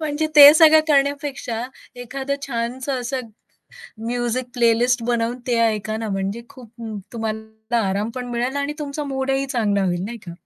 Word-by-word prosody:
म्हणजे 310 0 -1
ते 290 0 +11
सगळं 315 -1 +7
करण्यापेक्षा 280 -5 0 0.4
एखादं 270 +3 -4
छानसं 255 +2 -3
असं 255 +2 -3 0.9
म्युझिक 240 +1 -1
प्लेलिस्ट 240 0 +2
बनवून 235 0 -1
ते 240 -2 +1
ऐका 215 0 -2
ना, 220 0 -4
म्हणजे 195 +3 -3
खूप 255 -5 -14 0.4
तुम्हाला 220 0 -4
आराम 205 +4 -1
पण 250 -1 -5
मिळेल 245 +3 -2
आणि 285 +1 -2
तुमचा 295 0 -4
मूडही 270 0 -1
चांगला 215 -7 0
होईल, 175 -1 -1
नाही 235 +3 -6
का? - - -6
245 Hz, 150 wpm, -21 LUFS, 225-275 Hz, 0.9 s, ते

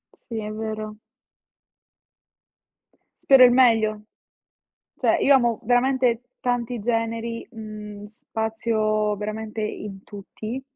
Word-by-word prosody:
Sì, 230 - -8
è 210 0 -5
vero. 215 -1 -5 2.3
Spero 265 -2 +8
il 245 - +6
meglio. 225 -4 +4 1.0
Cioè - - +3
io 280 - +5
amo 240 -3 +1
veramente 245 0 +2 0.2
tanti 245 -1 -1
generi, 230 +1 -2
mhmm, 210 -2 -9
spazio 215 -1 -1
veramente 215 +1 -5
in 210 -2 -5
tutti 215 +5 -7
220 Hz, 95 wpm, -24 LUFS, 215-240 Hz, 2.3 s, Spero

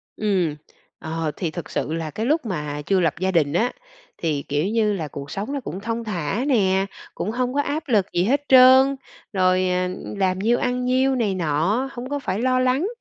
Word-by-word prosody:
Ừm, 185 -8 0 0.4
ờ, 160 -1 -3
thì 170 -4 -2
thực 175 -1 -7
sự 155 - -2
là 165 -1 -3
cái 220 - -3
lúc 305 +2 +1
mà 150 -7 -3
chưa 195 +2 +2
lập 165 -4 +2
gia 190 +1 0
đình 150 -5 +2
á, 235 +8 +2 0.5
thì, 150 -4 -1
kiểu 145 +3 0
như 215 0 +1
là, 165 -6 -3
cuộc 140 -1 -8
sống 210 +8 -4
nó 285 - -1
cũng 190 - -6
thong 230 +3 -3
thả 200 - -2
nè, 195 -7 +2 0.3
cũng 210 - -2
hông 250 +1 -1
có 285 - +2
áp 305 +2 -3
lực 205 -6 +3
gì 175 - +2
hết 275 +7 +2
trơn, 260 +1 +7 0.4
rồi, 185 -1 +2
à, 180 0 0 0.3
làm 185 -1 +1
nhiêu 230 +5 +2
ăn 250 0 -1
nhiêu 260 +1 +2
này 215 -6 0
nọ, 180 - 0
hông 250 +1 -7
có 285 0 -2
phải 195 -7 -3
lo 255 0 +2
lắng. 255 +8 +2
200 Hz, 210 wpm, -22 LUFS, 175-255 Hz, 0.5 s, trơn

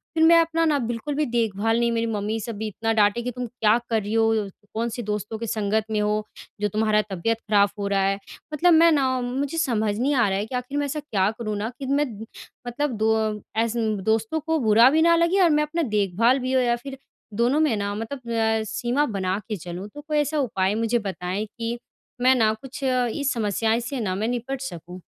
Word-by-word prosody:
फिर 320 - +3
मैं 335 +1 +7
अपना 330 0 0
ना, 300 -2 +2
बिल्कुल 240 +4 -3
भी 305 - +1
देखभाल 225 -2 0
नहीं 235 0 +2
मेरी 230 0 0
मम्मी 215 0 -2
सब 230 +1 -5
भी 220 +1 -3
इतना 225 +2 -2
डाँटे 210 +1 +3
की 250 +1 -3
तुम 250 +1 -5
क्या 225 -1 +2
कर 220 -2 +1
रही 205 +2 -5
हो? 225 0 +3 0.2
अ, - - -8 0.2
कौन-सी 235 +2 -2
दोस्तों 210 +1 -3
के 230 - -5
संगत 215 0 0
में 215 - +1
हो, 210 0 +1 0.5
जो 210 - +2
तुम्हारा 215 +1 +2
तबियत 220 +5 0
खराब 200 -1 +4
हो 200 - -1
रहा 200 -1 +1
है? 195 +1 0 0.3
मतलब 345 +3 +4
मैं 330 +1 +6
ना 280 -4 +3
मुझे 270 +5 -3
समझ 220 -9 0
नहीं 275 +4 +1
आ 235 -4 +3
रहा 195 - 0
है, 205 - -2
कि 250 - -6
आख़िर 250 +3 -3
मैं 290 - 0
ऐसा 285 +2 -3
क्या 205 -10 0
करूँ 215 -3 -3
ना, 210 +2 -2
कि 275 - -5
मैं 280 +2 +1 0.6
मतलब 290 +4 -1
दो 220 +1 +2
अ, 215 -1 -1 0.2
एसन 225 -2 0
दोस्तों 220 +8 0
को 320 +1 -1
बुरा 230 +1 +6
भी 315 +3 +2
ना 335 0 +5
लगे 340 +4 +3
और 345 - +5
मैं - - +3
अपना 330 +3 -2 0.2
देखभाल 215 +7 +2
भी 255 0 -2
हो 260 - +4
या 240 -1 +2
फिर 270 +3 -9 0.5
दोनों 265 +6 +2
में 305 -8 +2
ना 200 0 -2
मतलब 235 +2 -6 0.3
अ, - - -3
सीमा 240 +6 0
बना 185 +1 0
के 215 - -1
चलूँ। 180 +3 -7
तो 295 - -7
कोई 305 0 -2
ऐसा 295 +1 0
उपाय 205 -7 0
मुझे 230 +2 +1
बताएँ 195 0 -3
कि, 230 +2 -5 0.4
मैं 255 +1 +5
ना 220 -3 +3
कुछ 265 +5 -9
अ, 255 -2 +2
इस 280 +2 -1
समस्याएँ 225 0 0
से 250 +3 -4
ना 190 -5 -1
मैं 215 +3 -1
निपट 245 +2 -3
सकूँ। 180 - -7
230 Hz, 230 wpm, -24 LUFS, 210-270 Hz, 0.6 s, मैं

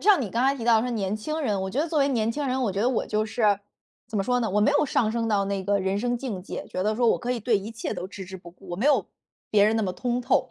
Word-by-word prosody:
像 405 -4 +5
你 215 -7 -3
刚 235 +2 +1
才 270 +1 +3
提 230 - -5
到 230 -2 +5
说 250 - -2
年 205 -4 -1
轻 305 +9 -4
人， 210 -9 0
我 190 - -3
觉 250 - -3
得 330 - -1
作 315 - 0
为 275 - +3
年 230 -4 +1
轻 295 +4 -3
人， 260 0 0
我 210 - 0
觉 195 - -2
得 240 - +3
我 255 - 0
就 215 0 0
是 210 -3 +2 0.5
怎 220 - -5
么 195 - +1
说 250 0 +1
呢， 225 - -1
我 205 +2 +2
没 215 - +4
有 290 - +3
上 225 -4 +1
升 230 -1 -1
到 205 -2 +2
那 195 -1 -2
个 200 +1 +1
人 190 +1 0
生 245 +2 0
境 235 -7 -5
界， - - -6
觉 185 - -3
得 215 +2 0
说 240 0 +2
我 - - +3
可 245 - -4
以 250 - 0
对 220 -1 +2
一 200 +3 -7
切 225 0 -4
都 180 - -5
置 195 -1 -8
之 190 +1 -8
不 175 -2 -12
顾， 185 +2 -17
我 175 - -3
没 225 +9 0
有 295 - +3 0.4
别 205 -1 +5
人 215 +2 +3
那 220 - +1
么 185 -3 -1
通 240 +6 -1
透， 250 - +1
220 Hz, 360 characters per minute, -26 LUFS, 200-245 Hz, 0.5 s, 像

